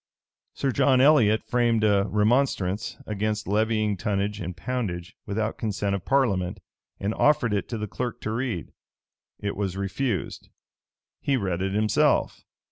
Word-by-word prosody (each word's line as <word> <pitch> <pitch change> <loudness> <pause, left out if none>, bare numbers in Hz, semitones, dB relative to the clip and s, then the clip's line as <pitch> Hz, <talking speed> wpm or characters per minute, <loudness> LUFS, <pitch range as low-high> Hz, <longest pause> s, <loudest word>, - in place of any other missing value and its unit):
Sir 135 - 0
John 130 +3 +3
Elliot 125 -6 +5
framed 120 -3 +1
a 100 -1 +3
remonstrance 105 -2 +1
against 105 0 -2
levying 110 0 +1
tonnage 105 0 -1
and 90 0 -5
poundage 95 -6 -3
without 110 +2 -2
consent 105 -2 -1
of 100 -3 -3
parliament, 105 -10 +1 0.4
and 100 +2 -1
offered 125 -7 +3
it 100 - -1
to 115 - -3
the 105 - -3
clerk 115 +4 -4
to 110 - -3
read. 115 -6 -3 0.7
It 100 0 -3
was 95 -2 -2
refused. 100 +1 -3 0.7
He 140 -2 +1
read 95 -5 -2
it 95 0 -1
himself. 105 0 +2
105 Hz, 140 wpm, -26 LUFS, 100-120 Hz, 0.7 s, Elliot